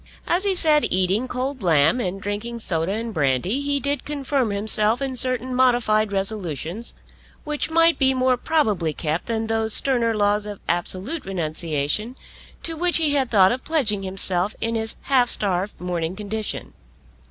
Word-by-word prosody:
As 360 +4 +1
he 390 -2 +1
sat 305 -4 +6
eating 190 +6 +1
cold 260 +1 -4
lamb 160 - +3
and 195 -4 -3
drinking 205 +4 -4
soda 170 -5 -2
and 225 +1 -4
brandy 150 - 0
he 285 0 0
did 280 0 -2
confirm 275 -4 -1
himself 210 +2 +2
in 270 -2 -3
certain 255 0 -1
modified 240 -4 +2
resolutions, 195 - -2 0.5
which 300 0 -3
might 330 +1 +4
be 265 -1 +3
more 255 0 +2
probably 215 - 0
kept 160 +1 -2
than 225 -1 -2
those 225 -1 -1
sterner 235 -4 +1
laws 205 0 +1
of 205 -2 -7
absolute 185 - -2
renunciation 165 - -2 0.5
to 330 - -3
which 350 +2 +1
he 310 -3 +1
had 270 -4 +1
thought 190 -4 +5
of 255 +2 -3
pledging 250 -11 0
himself 190 +1 +2
in 230 0 -1
his 220 -1 -2
half 255 -3 +3
starved 195 -1 +1
morning 175 -1 -3
condition. 215 +1 -4
220 Hz, 160 wpm, -22 LUFS, 190-260 Hz, 0.5 s, sat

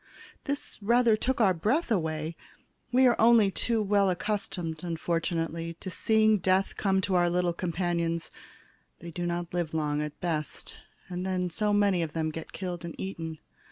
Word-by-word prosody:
This 285 0 -4
rather 235 +1 +4
took 255 +4 -1
our 200 -5 +5
breath 230 - 0
away. 160 -4 -1 0.6
We 255 +1 +5
are 245 -2 +5
only 225 -3 +6
too 225 +2 0
well 200 -1 +3
accustomed, 180 -4 -3
unfortunately, 165 -1 -2
to 185 +2 -7
seeing 220 +1 +3
death 190 +2 +1
come 190 -1 +1
to 190 0 -1
our 175 -1 +4
little 175 0 +1
companions; 170 -1 -1 0.7
they 170 +1 -9
do 175 +1 -3
not 175 0 -3
live 170 -3 -2
long, 150 -1 0
at 150 -1 -5
best, 160 -4 -3 0.3
and 180 0 -4
then 185 -1 -1
so 210 +4 0
many 200 -3 +3
of 160 -3 -3
them 160 -1 -1
get 160 +1 -7
killed 180 -3 -5
and 170 -1 -6
eaten. 165 -4 -5
180 Hz, 165 wpm, -28 LUFS, 165-205 Hz, 0.7 s, only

